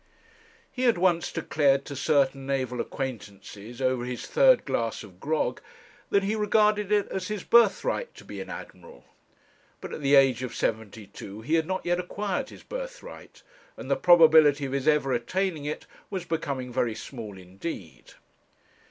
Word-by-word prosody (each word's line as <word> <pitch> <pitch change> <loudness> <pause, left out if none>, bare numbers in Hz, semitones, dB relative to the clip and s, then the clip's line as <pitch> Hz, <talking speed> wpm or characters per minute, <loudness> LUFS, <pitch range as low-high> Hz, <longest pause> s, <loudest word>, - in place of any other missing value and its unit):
He 255 - -6
had 235 -5 +4
once 175 -2 +2
declared 140 -2 +1
to 140 - -7
certain 135 -1 +1
naval 130 -3 -1
acquaintances, 110 -3 -7
over 130 -1 +1
his 125 0 -5
third - - +4
glass - - -2
of - - -15
grog, 475 - -1 0.5
that 200 -1 +2
he 205 +3 0
regarded 210 -1 +2
it 205 -1 +2
as 185 -1 -4
his 210 -3 -4
birthright 235 - +3
to - - -14
be - - -7
an - - -8
Admiral; 480 - -10 0.8
but - - -8
at - - -6
the 140 0 +4
age 135 -3 +5
of 130 - -5
seventy 110 -1 -3
two 100 +2 -10
he 145 +8 -3
had 160 -1 +2
not 185 0 -3
yet 175 0 +1
acquired 205 +7 -3
his - - -13
birthright, - - -9 0.3
and - - -7
the - - +4
probability 160 -4 +6
of 135 - -5
his 140 +1 -2
ever 150 -3 +3
attaining 160 +5 -1
it 150 - -4 0.2
was 185 -3 -4
becoming 135 -6 -3
very 120 -3 0
small 110 -7 -8
indeed. 95 - -8
145 Hz, 165 wpm, -27 LUFS, 125-195 Hz, 0.8 s, probability